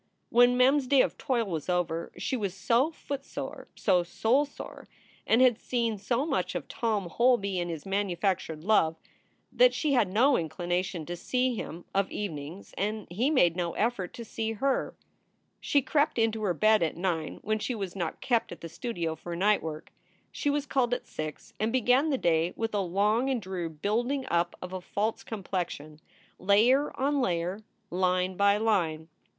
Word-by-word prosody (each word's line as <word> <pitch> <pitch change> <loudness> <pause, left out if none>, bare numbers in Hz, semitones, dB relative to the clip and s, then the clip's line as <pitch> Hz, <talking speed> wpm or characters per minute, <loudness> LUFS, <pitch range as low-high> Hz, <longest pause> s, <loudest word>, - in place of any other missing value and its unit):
When 245 +1 +5
Mem 260 +3 +5
s 270 -3 -2
day 275 0 +5
of - - -2
toil 240 -4 0
was 165 -4 -4
over 170 -2 -1
she 280 -2 -2
was 200 -6 -2
so 235 +9 +2
footsore, 280 -4 -6
so 180 - +3
soulsore, 245 +11 -1 0.4
and 235 +3 +5
had 245 -3 +4
seen 230 -4 -1
so 235 +7 0
much 325 - -1
of - - -4
Tom 215 -5 -1
Holby 200 -2 +2
and 175 0 -2
his 160 -3 -6
manufactured 190 -4 -1
love, 170 -6 +3 0.6
that - - +5
she 300 -3 +1
had 230 -7 +3
no 255 +7 +4
inclination 175 +1 -2
to 175 - -4
see 255 +7 0
him 175 -6 -6
of 195 0 +1
evenings, 165 -2 -6
and 210 +1 -2
he 235 +10 +1
made 175 - +4
no 175 -2 -2
effort 210 -5 -1
to 235 - -7
see 225 0 -3
her. 270 +4 -1 0.6
She 285 -2 +2
crept 290 0 +1
into 225 -1 +1
her 190 -5 0
bed 215 +4 +4
at 165 -1 -1
nine 170 -3 -2
when 215 +1 0
she 245 +3 -2
was 195 -4 -5
not 170 -4 -4
kept 235 -3 +1
at 175 - -9
the 165 - -7
studio 170 -6 -3
for 170 +1 -7
night 205 +4 +3
work. 155 -1 -7 0.4
She 290 - -1
was 290 0 0
called 250 -4 +1
at - - -8
six 155 -1 -7
and 220 +2 0
began 260 +4 +3
the 275 - +1
day 170 -3 +1
with 225 -1 -3
a 205 - +1
long 210 +8 +1
and 260 -3 +1
dreary 185 -4 -4
building 235 - -1
up 170 0 +1
of 180 0 -7
a 185 - -4
false 210 +5 -2
complexion, 175 -7 -5 0.4
layer 230 +9 +4
on 280 +1 +1
layer, 180 -2 -1 0.3
line 185 +1 +1
by 200 +1 +4
line. 175 -8 0
205 Hz, 180 wpm, -28 LUFS, 175-245 Hz, 0.6 s, When